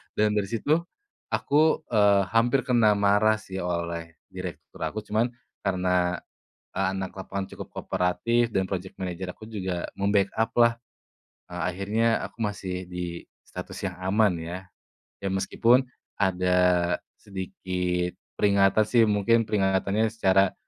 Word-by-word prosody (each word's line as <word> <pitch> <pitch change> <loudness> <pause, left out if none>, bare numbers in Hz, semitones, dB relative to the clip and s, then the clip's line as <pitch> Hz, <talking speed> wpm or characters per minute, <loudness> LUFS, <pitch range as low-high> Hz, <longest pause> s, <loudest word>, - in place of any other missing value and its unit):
dan 105 0 +3
dari 105 -2 0
situ 130 +9 +1 0.5
aku, 155 +2 +2
eee, 100 -3 +5
hampir 120 +4 +3
kena 115 -4 +4
marah 105 +2 +4
sih 95 -2 -7
oleh 85 -2 -3 0.2
direktur 85 -6 -8
aku, 110 0 -5
cuman, 110 +3 +1 0.3
karena 90 -2 +1 0.6
anak 95 0 -1
lapangan 95 0 -4
cukup - - -8
kooperatif 115 +7 0
dan 95 -1 +1
project 95 -1 -4
manager 90 0 -4
aku 110 - -12
juga 95 -5 -3
membackup 100 +3 +1
lah. 115 0 +6 0.8
Akhirnya 100 +6 0
aku 115 - -8
masih 95 -3 -3
di 90 -1 -5 0.2
status - - -7
yang 90 - -9
aman 100 -1 +3
ya. 85 +2 -5 0.7
Ya 95 - -1
meskipun 115 +6 +3 0.4
ada 90 -2 +2 0.6
sedikit 90 -2 -3 0.2
peringatan 100 +1 +4
sih, 115 +2 +3
mungkin 110 +2 +2
peringatannya 100 +2 +1
secara, 95 -3 +3
95 Hz, 120 wpm, -26 LUFS, 90-110 Hz, 0.8 s, lah